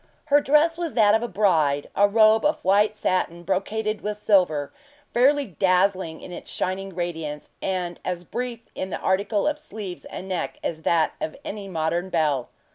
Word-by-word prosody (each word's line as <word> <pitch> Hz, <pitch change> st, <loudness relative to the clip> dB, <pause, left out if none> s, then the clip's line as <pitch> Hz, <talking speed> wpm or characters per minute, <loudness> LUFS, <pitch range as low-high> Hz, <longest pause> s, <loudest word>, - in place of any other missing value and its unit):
Her 290 Hz, -1 st, +4 dB
dress 305 Hz, +4 st, +3 dB
was 335 Hz, -4 st, -3 dB
that 210 Hz, -3 st, +5 dB
of 220 Hz, -, +3 dB
a 240 Hz, -, -2 dB
bride; 160 Hz, -9 st, +1 dB
a 205 Hz, -, +5 dB
robe 215 Hz, +1 st, +5 dB
of 300 Hz, -, 0 dB
white 205 Hz, +2 st, +4 dB
satin 175 Hz, -4 st, -1 dB
brocaded 210 Hz, +4 st, -1 dB
with 210 Hz, 0 st, -3 dB
silver, 180 Hz, -9 st, +2 dB, 0.4 s
fairly 280 Hz, +4 st, +4 dB
dazzling 185 Hz, -, +1 dB
in -, -, -9 dB
its -, -, -8 dB
shining 190 Hz, 0 st, -3 dB
radiance, 160 Hz, -4 st, -4 dB
and 180 Hz, -2 st, -2 dB
as 180 Hz, -1 st, -3 dB
brief 240 Hz, +4 st, -4 dB
in 190 Hz, -, -4 dB
the -, -, -4 dB
article 200 Hz, +5 st, +1 dB
of 300 Hz, 0 st, 0 dB
sleeves 200 Hz, -7 st, -8 dB
and 190 Hz, -, -7 dB
neck 185 Hz, -2 st, -3 dB
as 160 Hz, -1 st, -3 dB
that 165 Hz, -1 st, +2 dB
of 155 Hz, -, -4 dB
any 200 Hz, -1 st, -5 dB
modern 170 Hz, +1 st, -1 dB
belle. 150 Hz, -7 st, 0 dB
190 Hz, 175 wpm, -24 LUFS, 175-215 Hz, 0.4 s, that